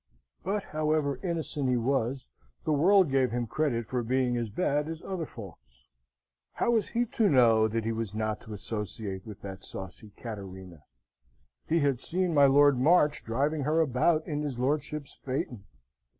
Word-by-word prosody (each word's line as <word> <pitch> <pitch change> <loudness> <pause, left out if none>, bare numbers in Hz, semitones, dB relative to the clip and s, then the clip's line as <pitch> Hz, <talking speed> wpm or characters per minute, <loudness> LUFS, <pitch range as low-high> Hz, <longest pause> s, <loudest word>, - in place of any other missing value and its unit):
But, 200 +1 -1
however 155 -3 0
innocent 160 -6 -2
he 125 - +2
was, 130 - -1 0.3
the 155 - +1
world 180 +2 +4
gave 135 -2 +3
him 120 +1 -2
credit 120 -2 -1
for 125 +2 -2
being 125 +1 +1
as 120 -2 -2
bad 145 - 0
as 165 0 -6
other 180 -5 -4
folks. 75 - -13 0.6
How - - +1
was 225 -3 +2
he 240 +1 +1
to 220 -2 +1
know 115 -5 +5
that 110 0 -2
he 115 - 0
was 110 -2 -4
not 110 -1 -2
to 110 - -9
associate 105 -1 -5
with 105 -2 -9
that 95 -1 -8
saucy 95 +3 -8
Cattarina? 95 - -8 0.9
He 165 0 +2
had 140 -4 +1
seen 180 +4 -1
my 140 -2 +6
Lord 140 -1 +5
March 150 +1 +4
driving 140 +7 0
her 155 +4 +1
about 155 +2 +2
in 150 -2 -3
his 145 -5 -3
lordship's 145 +2 -2
phaeton. 125 -5 -3
130 Hz, 165 wpm, -29 LUFS, 110-155 Hz, 0.9 s, my